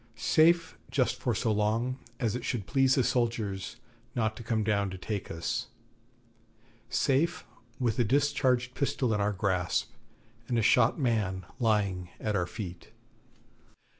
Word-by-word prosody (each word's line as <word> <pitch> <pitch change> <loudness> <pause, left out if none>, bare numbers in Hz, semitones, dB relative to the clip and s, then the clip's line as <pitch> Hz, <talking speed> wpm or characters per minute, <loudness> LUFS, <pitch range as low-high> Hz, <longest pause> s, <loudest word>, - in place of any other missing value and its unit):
Safe 165 +1 +3
just - - +1
for - - -1
so 110 - 0
long 110 +5 0 0.2
as 115 -3 0
it 125 - -4
should 115 -6 -2
please 135 +1 +3
the 130 - +3
soldiers 115 -6 -1 0.4
not 110 -2 0
to - - -9
come 115 -1 0
down 100 -2 +1
to 95 - -6
take 100 +1 -4
us, 80 0 -3 1.2
safe 150 +8 +1 0.3
with 120 -2 0
a - - +5
discharged 125 0 +2
pistol 130 -4 0
in 105 - 0
our 105 +1 +2
grasp, 95 -4 0 0.6
and 120 - 0
a 115 - +2
shot 120 +1 +4
man 105 - 0
lying 100 -6 +1
at 105 -1 -1
our 90 -3 0
feet. 90 -2 -7
110 Hz, 145 wpm, -29 LUFS, 100-125 Hz, 1.2 s, a